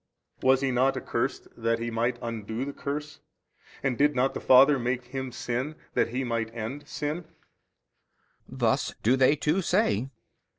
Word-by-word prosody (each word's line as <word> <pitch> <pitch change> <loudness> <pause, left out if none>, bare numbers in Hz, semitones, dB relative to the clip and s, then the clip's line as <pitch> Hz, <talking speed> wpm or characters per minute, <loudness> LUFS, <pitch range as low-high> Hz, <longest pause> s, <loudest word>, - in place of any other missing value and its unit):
A. - - 0
Was 130 0 +5
He 135 -1 +1
not 130 +2 +2
accursed - - -2
that 115 0 0
He 115 +1 -4
might 115 +2 0
undo 115 +1 -4
the 140 - -5
curse 145 +1 -5 0.6
and 130 -3 0
did 145 0 +4
not 130 +1 +2
the - - -4
Father 135 +2 +6
make 125 +1 -1
Him 130 0 -5
sin 125 +5 -3 0.2
that - - +2
He 125 +3 -2
might 115 -2 -2
end 130 +6 -5
sin? 150 +4 -3
B. 165 - -21 1.2
Thus - - 0
do 120 +4 +4
they 135 +2 +4
too 155 +6 +1
say. 165 - +1
130 Hz, 170 wpm, -27 LUFS, 120-140 Hz, 1.2 s, Father